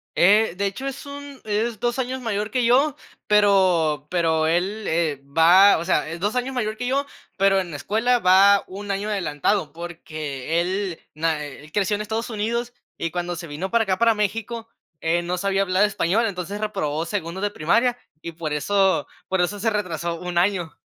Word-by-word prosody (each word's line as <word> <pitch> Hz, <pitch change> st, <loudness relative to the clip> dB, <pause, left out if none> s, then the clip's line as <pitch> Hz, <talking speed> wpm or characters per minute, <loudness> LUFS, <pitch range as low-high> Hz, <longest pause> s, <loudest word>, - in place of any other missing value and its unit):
Eh, 205 Hz, +1 st, +4 dB
de 200 Hz, -, +1 dB
hecho, 200 Hz, +8 st, -4 dB
es 275 Hz, +1 st, -6 dB
un 285 Hz, -1 st, -9 dB
es 220 Hz, +1 st, -1 dB
2 240 Hz, +1 st, -1 dB
años 260 Hz, 0 st, -2 dB
mayor 210 Hz, -3 st, -2 dB
que 250 Hz, -2 st, 0 dB
yo, 265 Hz, +4 st, +3 dB, 0.3 s
pero 185 Hz, -8 st, +3 dB
pero 160 Hz, -3 st, +1 dB
él, 190 Hz, +6 st, 0 dB
eh, 160 Hz, -4 st, 0 dB
va 170 Hz, +7 st, +6 dB
o 170 Hz, -, -4 dB
sea, 155 Hz, -3 st, +1 dB
es 165 Hz, +1 st, -6 dB
2 205 Hz, +6 st, -1 dB
años 255 Hz, +2 st, -1 dB
mayor 215 Hz, -3 st, -2 dB
que 245 Hz, +2 st, -4 dB
yo, 275 Hz, +2 st, 0 dB, 0.3 s
pero 195 Hz, 0 st, +4 dB
en 180 Hz, -2 st, -5 dB
la 150 Hz, -, -5 dB
escuela 235 Hz, +8 st, +1 dB
va 195 Hz, +1 st, +6 dB
1 200 Hz, +2 st, -8 dB
año 200 Hz, +2 st, -2 dB
adelantado 180 Hz, -3 st, -1 dB
porque 160 Hz, -3 st, -4 dB
él 185 Hz, 0 st, -2 dB
na 155 Hz, 0 st, 0 dB
eh, 145 Hz, -1 st, -9 dB
él 150 Hz, -, -16 dB
creció 205 Hz, 0 st, +1 dB
en 210 Hz, -, -4 dB
Estados 220 Hz, +2 st, -3 dB
Unidos 235 Hz, +2 st, -2 dB, 0.2 s
y 165 Hz, -, -2 dB
cuando 175 Hz, +1 st, -3 dB
se 170 Hz, 0 st, -7 dB
vino 165 Hz, +6 st, -5 dB
para 230 Hz, +1 st, +3 dB
acá 190 Hz, -1 st, 0 dB
para 230 Hz, -1 st, +4 dB
México, 225 Hz, +2 st, -3 dB, 0.3 s
él 170 Hz, +1 st, 0 dB
no 180 Hz, +1 st, -2 dB
sabía 195 Hz, +1 st, +1 dB
hablar 190 Hz, +1 st, +2 dB
español, 210 Hz, +2 st, +1 dB
entonces 200 Hz, 0 st, -4 dB
reprobó 165 Hz, -7 st, -2 dB
segundo 185 Hz, -1 st, -4 dB
de 205 Hz, -, 0 dB
primaria 230 Hz, +9 st, +1 dB, 0.2 s
y 170 Hz, -, -7 dB
por 160 Hz, -2 st, -4 dB
eso 190 Hz, +5 st, +2 dB, 0.2 s
por 190 Hz, -1 st, 0 dB
eso 190 Hz, +4 st, 0 dB
se 225 Hz, +2 st, +1 dB
retrasó 170 Hz, -5 st, -3 dB
1 180 Hz, -1 st, -5 dB
año. 175 Hz, -2 st, +1 dB
195 Hz, 195 wpm, -23 LUFS, 170-220 Hz, 0.3 s, va